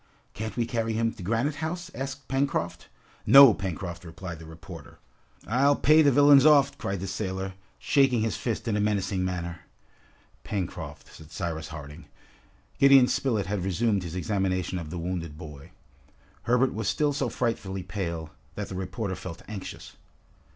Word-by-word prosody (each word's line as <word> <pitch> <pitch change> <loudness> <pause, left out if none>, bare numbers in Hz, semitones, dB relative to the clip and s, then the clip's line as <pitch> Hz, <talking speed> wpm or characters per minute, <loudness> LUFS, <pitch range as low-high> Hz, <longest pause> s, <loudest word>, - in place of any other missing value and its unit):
can't 110 -1 -6
we 120 - +1
carry 115 -1 -2
him 115 +1 0
to 110 - -12
Granite 115 - -1
House?" 175 +3 -4
asked 135 0 -6
Pencroft. 135 -10 -1 0.4
"No, 135 -4 +10
Pencroft," 90 -2 -5
replied 85 0 -8
the 80 - -11
reporter. 80 -1 -11 0.5
"I'll 140 +5 +3
pay 155 +3 +5
the 145 -2 +5
villains 145 0 +7
off!" 140 -2 +5
cried 95 -2 -3
the - - -3
sailor, 95 -1 -4 0.2
shaking 135 -5 +3
his 110 0 0
fist 115 -1 -3
in 110 - +1
a - - +1
menacing 100 -2 0
manner. 85 -2 -3 0.8
"Pencroft!" 95 -5 -5
said 80 0 -14
Cyrus 80 -3 -4
Harding. 75 -2 -9 0.7
Gideon 135 -2 +7
Spilett 115 -9 0
had 100 -1 -2
resumed 100 +2 +1
his 85 -1 -6
examination 95 -1 -1
of 80 -3 -7
the 90 - -5
wounded 85 -3 -4
boy. 75 -3 -10 0.8
Herbert 125 +2 +3
was 110 -1 -3
still 145 +7 +1
so 140 0 -1
frightfully 95 -5 -2
pale, 85 -4 -4 0.2
that 105 - -5
the 95 - -6
reporter 95 +2 -3
felt 90 -2 -8
anxious. 105 -3 -8
100 Hz, 160 wpm, -27 LUFS, 90-125 Hz, 0.8 s, No